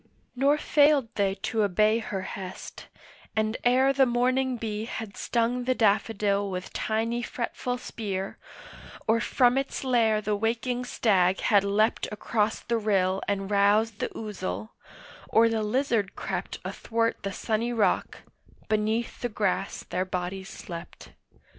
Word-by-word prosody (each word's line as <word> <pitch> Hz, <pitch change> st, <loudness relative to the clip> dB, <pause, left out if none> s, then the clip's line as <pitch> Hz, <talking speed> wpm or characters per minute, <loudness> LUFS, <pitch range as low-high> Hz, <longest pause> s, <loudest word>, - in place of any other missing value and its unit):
Nor 280 Hz, +4 st, +3 dB
failed 290 Hz, -5 st, +4 dB
they 195 Hz, -3 st, +1 dB
to 225 Hz, -2 st, 0 dB
obey 215 Hz, +3 st, +3 dB
her 195 Hz, -4 st, -4 dB
hest, 190 Hz, -1 st, -8 dB, 0.5 s
and 215 Hz, +1 st, +1 dB
ere 260 Hz, +2 st, +4 dB
The 270 Hz, -1 st, +4 dB
morning 255 Hz, +1 st, +1 dB
bee 215 Hz, -1 st, -3 dB
had 220 Hz, -3 st, -6 dB
stung 240 Hz, +1 st, 0 dB
the 255 Hz, 0 st, +2 dB
daffodil 205 Hz, -2 st, +2 dB
With 185 Hz, -1 st, -5 dB
tiny 230 Hz, +2 st, -1 dB
fretful 245 Hz, +1 st, -3 dB
spear, 195 Hz, -5 st, -5 dB, 0.7 s
or 225 Hz, +1 st, +4 dB
from 250 Hz, +2 st, +3 dB
its 275 Hz, 0 st, -4 dB
lair 230 Hz, -4 st, +3 dB
The 210 Hz, 0 st, -1 dB
waking 235 Hz, +3 st, -1 dB
stag 190 Hz, -6 st, +2 dB
had 205 Hz, -2 st, +4 dB
leapt 210 Hz, +3 st, +1 dB
across 210 Hz, 0 st, -1 dB
the 235 Hz, -1 st, -1 dB
rill 195 Hz, -3 st, +1 dB
And 195 Hz, 0 st, -2 dB
roused 205 Hz, +2 st, +3 dB
the -, -, -1 dB
ouzel, 110 Hz, -, -5 dB, 0.6 s
or 230 Hz, +1 st, +5 dB
the 225 Hz, -1 st, 0 dB
lizard 220 Hz, -2 st, 0 dB
crept -, -, -4 dB
Athwart 230 Hz, 0 st, -1 dB
the 195 Hz, -, -3 dB
sunny 225 Hz, +4 st, -1 dB
rock, 225 Hz, -3 st, 0 dB, 0.5 s
beneath 220 Hz, +2 st, 0 dB
the 245 Hz, -, -1 dB
grass 205 Hz, -2 st, -1 dB
their 185 Hz, -, -2 dB
bodies 185 Hz, +1 st, -4 dB
slept. 170 Hz, -5 st, -9 dB
220 Hz, 140 wpm, -27 LUFS, 200-240 Hz, 0.7 s, or